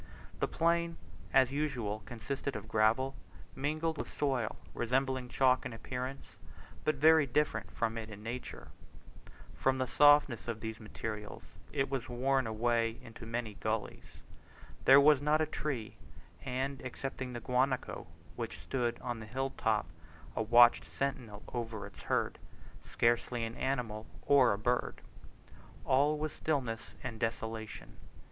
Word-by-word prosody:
The - - +1
plain 170 0 +1 0.3
as 130 -1 +5
usual 125 -8 -2
consisted 130 +4 -4
of 110 0 -6
gravel, 115 +5 +2 0.4
mingled 155 +3 -1
with - - -4
soil 130 -6 0 0.2
resembling 130 +1 0
chalk 130 0 +3
in 125 - -5
appearance, 125 +4 -6 0.5
but 155 - +2
very 155 +1 +6
different 125 -5 0
from 115 0 -1
it 110 -1 -7
in 105 -1 -10
nature. 120 +3 -6 0.8
From 130 0 +1
the 130 - +1
softness 145 -3 +5
of 115 -2 -3
these 110 0 -5
materials 105 -1 -6 0.3
it 135 -1 +1
was 135 -2 -3
worn 130 +1 +1
into 115 0 -1
many 115 -2 -3
gulleys. 110 +1 -4 0.6
There 135 +1 +9
was 145 -1 +6
not 150 +1 +3
a 155 - +3
tree, 140 -8 -4 0.5
and, 135 +1 -2
excepting 130 0 -5
the 120 - -4
guanaco, 125 +2 0 0.3
which - - -5
stood 120 -3 -1
on 120 -2 -3
the 110 - -8
hill 135 +4 -2
top 110 -2 +1 0.5
a - - 0
watchful 120 +2 +6
sentinel 125 -7 -3
over 115 -3 -3
its - - -12
herd, - - 0 0.4
scarcely 120 0 +1
an 115 - -5
animal 120 -5 -2 0.2
or 135 -3 +6
a 100 - 0
bird. 120 +4 -1 0.8
All 145 +3 +3
was 155 0 -3
stillness 125 -8 -2
and 120 -3 -5
desolation. 115 -1 -4
125 Hz, 140 wpm, -33 LUFS, 115-135 Hz, 0.8 s, There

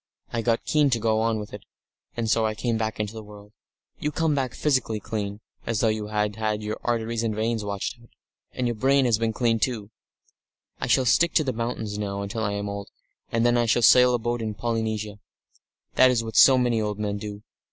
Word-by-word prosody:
I 115 - 0
got 115 0 0
keen 150 -2 +3
to 120 -3 +1
go 110 0 +1
on 115 0 +1
with 105 -1 -7
it, 105 - -7 0.6
and 115 -1 -1
so 115 +1 +2
I 110 -1 0
came 115 +2 -1
back 110 -1 -2
into 105 0 -2
the 110 - -7
world. 105 -1 -14 0.5
You 150 - -2
come 160 0 +1
back 130 -3 -2
physically 130 -7 0
clean 105 0 -4 0.3
as 115 -2 0
though 115 - +3
you 110 -1 -2
had 105 0 -1
had 110 -1 -1
your 105 +1 -4
arteries 115 -1 -1
and 110 -2 -1
veins 110 0 -1
washed 100 +4 -4
out. 115 - -19 0.4
And 125 - -3
your 120 - 0
brain 135 +4 +3
has 115 -3 +2
been 115 0 0
cleaned, 115 -1 0
too.... 110 -5 -2 0.9
I - - -2
shall 130 - +3
stick 170 +7 +3
to 155 - +4
the 130 -3 -2
mountains 110 -3 -3
now 100 -1 -3
until 105 +3 -4
I 100 -2 -1
am 100 0 -3
old, 100 0 -6 0.4
and 115 +1 +1
then 120 0 +3
I 120 - +1
shall 120 +2 +2
sail 125 +1 +7
a - - +2
boat 120 +1 -2
in 110 -2 -3
Polynesia. 110 -2 -3 0.7
That 130 - +6
is 120 -2 +1
what 110 0 -7
so 135 -1 +8
many 120 -3 +1
old 105 -1 -2
men 105 -1 -2
do. 105 -1 -7
110 Hz, 225 wpm, -25 LUFS, 105-120 Hz, 0.9 s, so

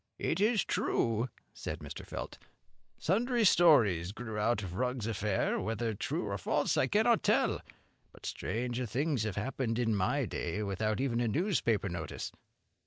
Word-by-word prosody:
"It 160 - -1
is 215 -1 +3
true," 115 +2 0 0.2
said 75 - -5
Mr. 75 -3 -8
Felt, - - -6 0.6
"sundry 235 +6 +1
stories 105 - +5
grew 110 -2 -6
out 105 0 +1
of 90 -2 -6
Rugg's 125 +2 -1
affair, 105 -3 0
whether 115 0 -1
true 100 - -2
or - - -3
false - - +1
I - - +3
cannot - - +3
tell; - - +2 0.5
but - - -14
stranger 120 +2 -2
things 140 +2 0
have 105 -4 -2
happened 115 +1 -2
in 115 -2 +1
my 125 +8 +1
day, 100 0 -3
without 105 +3 -1
even 130 -3 0
a 120 - +1
newspaper 115 - +1
notice." 85 -4 -5
115 Hz, 155 wpm, -32 LUFS, 105-135 Hz, 0.6 s, stories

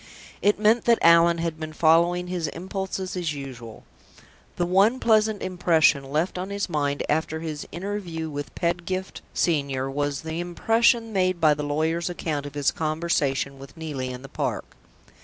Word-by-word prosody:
It 205 +1 +3
meant 220 +3 +3
that 235 -1 +5
Allan 170 0 +6
had 165 -1 -3
been 155 -1 -6
following 170 +3 +3
his 180 -3 -2
impulses 190 +3 -4
as 170 -5 -2
usual. 120 -5 -9 0.7
The 175 - 0
one 200 +8 +3
pleasant 220 -3 +2
impression 165 -6 +3
left 155 +7 -1
on 185 +2 -4
his 200 -1 -2
mind 145 -4 -1
after 160 +1 0
his 155 -3 -5
interview 175 -4 -4
with 145 -2 -6
Pedgift 175 +2 -2
Senior 140 -5 0
was 145 0 -2
the 160 +1 -4
impression 225 +6 +2
made 185 -2 +1
by 155 -2 +5
the 150 - -4
lawyer's 160 +4 -1
account 150 -5 -3
of 145 - -11
his 145 -1 +2
conversation 155 -4 -1
with 135 +3 -12
Neelie 145 -5 -4
in 125 +1 -7
the - - -8
park. - - -4
165 Hz, 160 wpm, -25 LUFS, 145-185 Hz, 0.7 s, Allan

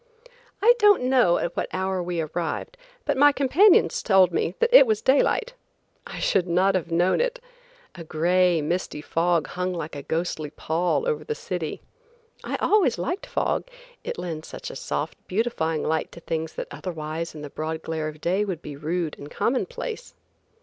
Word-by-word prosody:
I 475 +2 +8
don't 415 - +5
know 250 -9 +4
at 170 - -3
what - - -1
hour 190 0 -1
we 175 -1 -2
arrived, 170 - -4 0.3
but - - +1
my 290 +1 +7
companions 285 +9 +4
told 190 -4 +4
me 175 +1 -1
that 475 +1 +1
it - - +9
was 215 -2 +2
daylight. 285 - +2 0.5
I - - -8
should 185 -2 +1
not 185 +3 +3
have 175 -3 -2
known 175 - +2
it. - - -1 0.5
A 170 - -9
gray, 170 +1 +2
misty 170 0 -2
fog 165 +1 +1
hung 180 0 -3
like 160 -2 -5
a 145 - -5
ghostly 160 0 -3
pall 170 - -1
over 470 -2 -1
the 450 - -3
city. - - -4 0.6
I - - -3
always 370 - +2
liked 185 - -3
fog, - - -1 0.4
it 485 +1 -4
lends 160 -3 -5
such - - -7
a - - -10
soft, - - -4
beautifying 180 -7 -1
light 160 0 -1
to - - -10
things 160 -1 -3
that - - -6
otherwise 165 -2 -5
in 150 - -8
the 145 - -8
broad 160 +1 -4
glare 160 -1 -3
of 155 0 -8
day 185 +4 +1
would 185 -5 -4
be 145 - -7
rude 160 +2 -2
and 145 - -9
commonplace. 465 - -3
180 Hz, 175 wpm, -25 LUFS, 160-250 Hz, 0.6 s, it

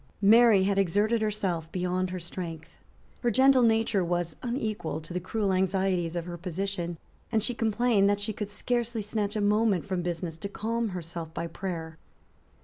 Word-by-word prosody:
Mary 220 -1 +7
had 195 0 +2
exerted 205 +5 +2
herself 190 -7 -1
beyond 180 0 -1
her 185 - -4
strength. 165 -2 -6 0.5
Her 240 - +2
gentle 260 +2 +5
nature 225 -4 +3
was 175 -2 -1
unequal 215 - -2
to 160 +2 -9
the 180 - -1
cruel 195 +2 -1
anxieties 185 -2 +1
of 170 -1 -2
her 175 -1 -7
position; 175 0 -3 0.3
and 220 -2 +2
she 245 - 0
complained 225 -2 +2
that 205 0 +1
she 210 +1 -2
could 210 0 -5
scarcely 235 +1 -1
snatch 210 0 -2
a 210 - 0
moment 210 -3 +2
from 190 -3 -2
business 170 -2 -3
to 200 +5 -5
calm 230 +3 -2
herself 170 -3 -5
by 170 - -2
prayer. 165 -2 -5
195 Hz, 170 wpm, -28 LUFS, 175-220 Hz, 0.5 s, Mary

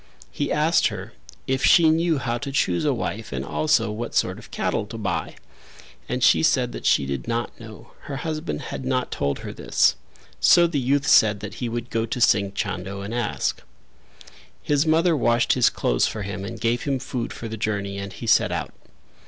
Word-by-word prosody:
He 145 - -2
asked 155 +3 +3
her - - -7 0.3
if 130 0 -1
she 165 -3 +6
knew 165 0 +2
how 120 -2 -2
to 140 -1 -5
choose 95 -5 +1
a 145 - +3
wife 115 -3 -4
and 65 0 -3
also 120 - +1
what 115 +2 -5
sort - - +1
of - - -14
cattle 105 - -2
to 115 - -8
buy, 100 -6 -3 0.7
and - - -1
she - - +5
said - - +2
that - - -4
she - - +3
did 70 +7 -4
not 120 0 -3
know; 115 -2 -12
her 140 - -5
husband 155 +3 -4
had - - -6
not 130 -1 -1
told 70 0 -1
her - - -6
this. - - +2 0.4
So 175 - +6
the 165 -4 0
youth 140 +3 +1
said 105 -7 +5
that 105 -1 -6
he 120 - -1
would 120 +1 -5
go 115 0 -1
to 120 - -3
Singh 100 -4 +3
Chando 100 +1 -4
and 100 +3 -6
ask. 120 - -2 1.0
His 145 +2 +1
mother 165 +2 +3
washed 120 -3 +2
his 125 - +4
clothes - - +1
for 105 - -4
him 95 0 -5
and 115 +2 -7
gave 120 +6 0
him 140 -2 0
food 125 -2 -4
for 115 - -7
the 110 - -5
journey 100 -3 -3
and 100 0 -6
he - - -8
set - - +3
out. - - -3
120 Hz, 200 wpm, -23 LUFS, 100-140 Hz, 1.0 s, she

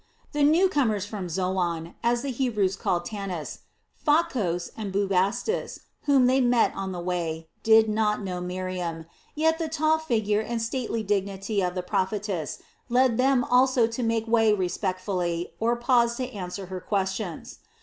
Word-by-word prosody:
The 295 - -1
new 320 +6 +5
comers 225 - +1
from 205 -4 -5
Zoan, 175 -2 -1
as 240 +1 +1
the 280 - -2
Hebrews 215 -7 0
called 175 -1 -1
Tanis, 195 -7 -5 0.3
Pha 310 +2 +3
kos, 180 - -2
and 210 -3 -5
Bubastis, 200 - 0 0.2
whom 275 -3 +5
they 260 +2 +4
met 240 -2 +3
on 190 -1 -4
the 180 - -5
way, 165 -2 -3
did 220 0 +6
not 210 0 +1
know 180 -2 -4
Miriam, 180 -2 -4 0.3
yet 320 +2 +2
the 325 -1 -2
tall 315 0 +2
figure 220 -8 0
and 235 +1 -3
stately 230 -1 -2
dignity 200 0 -1
of 180 -1 -1
the 180 - -2
prophetess 190 -3 -2 0.3
led 250 -1 +3
them 260 -1 +3
also 255 -1 +4
to 230 +2 -4
make 225 -1 0
way 225 -1 +4
respectfully 185 -2 -1
or 235 +2 +2
pause 235 -1 +2
to 255 0 -4
answer 190 -1 -6
her 185 0 -6
questions. 190 -3 -3
210 Hz, 160 wpm, -26 LUFS, 185-245 Hz, 0.3 s, did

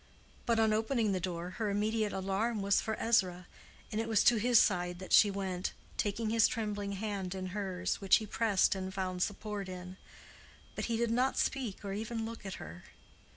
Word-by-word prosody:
But 230 -1 +3
on 220 -1 +4
opening 220 0 +1
the 185 - 0
door 180 -1 -4
her 215 - +1
immediate 210 +1 0
alarm 195 +3 -1
was 200 0 +3
for 220 - -2
Ezra, 185 -6 +2 0.5
and 215 - 0
it 225 - -4
was 220 -2 +4
to 240 - +5
his 235 +1 +5
side 180 -2 +1
that 185 +1 -6
she 210 - +8
went, 190 -2 -3 0.2
taking 215 +2 -1
his 225 -1 +5
trembling 205 -3 -3
hand 195 -2 -3
in 185 -1 -4
hers, 190 -3 -2
which 195 -1 +6
he 220 - 0
pressed 210 -2 +2
and 190 -1 -4
found 185 -2 -3
support 205 0 -3
in; 180 0 -8 0.8
but - - -3
he 230 -1 -1
did 235 0 0
not 255 +3 +1
speak 240 -8 -1
or 195 - -3
even 225 +2 -3
look 225 -3 -7
at 190 - -5
her. 85 +3 -9
205 Hz, 195 wpm, -32 LUFS, 190-225 Hz, 0.8 s, she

